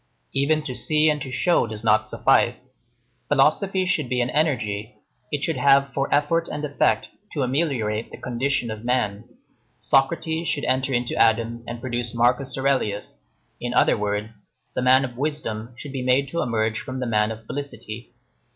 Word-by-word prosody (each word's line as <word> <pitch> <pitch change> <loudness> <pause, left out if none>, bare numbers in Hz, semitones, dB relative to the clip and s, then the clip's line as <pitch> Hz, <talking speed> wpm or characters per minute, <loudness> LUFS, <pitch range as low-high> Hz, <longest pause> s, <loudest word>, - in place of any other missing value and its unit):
Even 150 +3 +2
to 130 - -4
see 155 +4 +2
and 150 -1 -3
to 135 - -5
show 170 +1 +2
does 110 0 -5
not 110 -1 +3
suffice. - - +1 0.5
Philosophy 190 -1 +2
should 155 -8 0
be 125 -1 0
an 120 0 0
energy; 115 -9 -1 0.4
it 145 -1 -2
should 165 -4 0
have 140 0 +4
for 135 0 -1
effort 155 +4 +2
and 150 0 -4
effect 145 -1 +1 0.2
to 145 - -1
ameliorate 125 -6 -1
the - - -10
condition 125 -1 -1
of 110 0 -7
man. 120 -4 0 0.5
Socrates 160 +5 +1
should 145 - -1
enter 130 +2 +1
into 120 -1 0
Adam 115 +1 +2
and 120 0 -5
produce 120 -2 -3
Marcus 125 +4 +1
Aurelius; 130 -7 -1 0.3
in - - -3
other - - +5
words, 105 +1 -3 0.3
the - - -1
man 130 +2 +5
of 125 -2 -9
wisdom 125 -6 -3
should 145 - -8
be 135 -1 -3
made 130 +2 +2
to 170 - -1
emerge 110 -2 0
from 130 -1 -6
the 125 - -2
man 105 -2 +2
of 110 0 -7
felicity. 120 -4 -6
130 Hz, 170 wpm, -24 LUFS, 115-145 Hz, 0.5 s, other